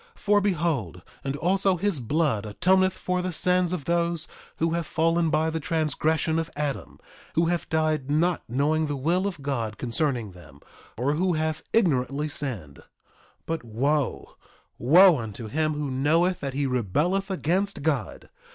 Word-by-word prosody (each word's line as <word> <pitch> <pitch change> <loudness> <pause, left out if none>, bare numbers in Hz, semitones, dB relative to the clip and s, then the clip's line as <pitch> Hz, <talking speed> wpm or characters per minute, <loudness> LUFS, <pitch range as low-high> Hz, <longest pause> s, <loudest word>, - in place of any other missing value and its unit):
3:11 - - -22
For 205 0 +3
behold, 155 - -1 0.2
and 135 0 -2
also 185 +4 +1
his 195 -3 0
blood 135 -3 0
atoneth 185 - +3
for 180 -1 -2
the 185 0 -2
sins 180 +1 +1
of 175 -7 -3
those 170 -1 0 0.3
who 165 0 0
have 170 -1 -2
fallen 165 0 +1
by 160 +1 +1
the 160 - -2
transgression 160 0 0
of 165 0 -3
Adam, 145 -2 -4 0.4
who 165 - +3
have 175 0 -1
died 155 -3 0
not 165 +4 +1
knowing 150 +5 +1
the 145 - -2
will 170 +8 +1
of 175 -8 -6
God 115 -6 -2
concerning 120 -3 -1
them, 75 -6 -15 0.4
or 130 +5 +1
who 180 +3 +1
have 155 0 -1
ignorantly 150 - +1
sinned. 110 - -4
3:12 - - -16 0.6
But 165 -3 -3
wo, 125 - -1 0.4
wo 170 +4 +6
unto 110 0 -6
him 155 +7 -1
who 145 -2 -3
knoweth 160 +7 +2
that 135 -2 -4
he 140 0 0
rebelleth 145 - 0
against 190 0 -1
God! 140 -9 -2
155 Hz, 160 wpm, -26 LUFS, 135-170 Hz, 0.6 s, wo